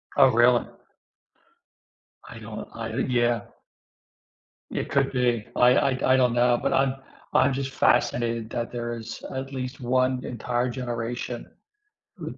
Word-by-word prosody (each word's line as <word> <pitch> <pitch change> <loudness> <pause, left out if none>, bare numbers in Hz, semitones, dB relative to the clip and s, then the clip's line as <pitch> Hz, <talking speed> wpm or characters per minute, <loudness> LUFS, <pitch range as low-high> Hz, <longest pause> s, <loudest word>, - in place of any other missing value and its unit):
Oh, 135 -2 +7
really? 120 +1 +4 1.6
I - - -10
don't, - - -8
I 115 0 -5
yeah. 120 -2 +2 1.3
It - - -3
could 140 -1 +1
be. 120 -4 +1
I 125 +1 +5
I 135 - +2
d 130 - -5
I 130 0 +4
don't 125 -2 +3
know, 120 0 +3
but - - 0
I'm 135 0 +2 0.4
I'm 135 0 +4
just 135 0 -3
fascinated 115 -4 +1
that 120 0 -3
there 120 -1 -4
is 115 0 -8
at 135 +1 -5
least 130 0 -5
one 130 +1 +1
entire 120 +1 -2
generation, 120 -1 -4 0.8
uh, - - -4
125 Hz, 140 wpm, -25 LUFS, 120-130 Hz, 1.6 s, Oh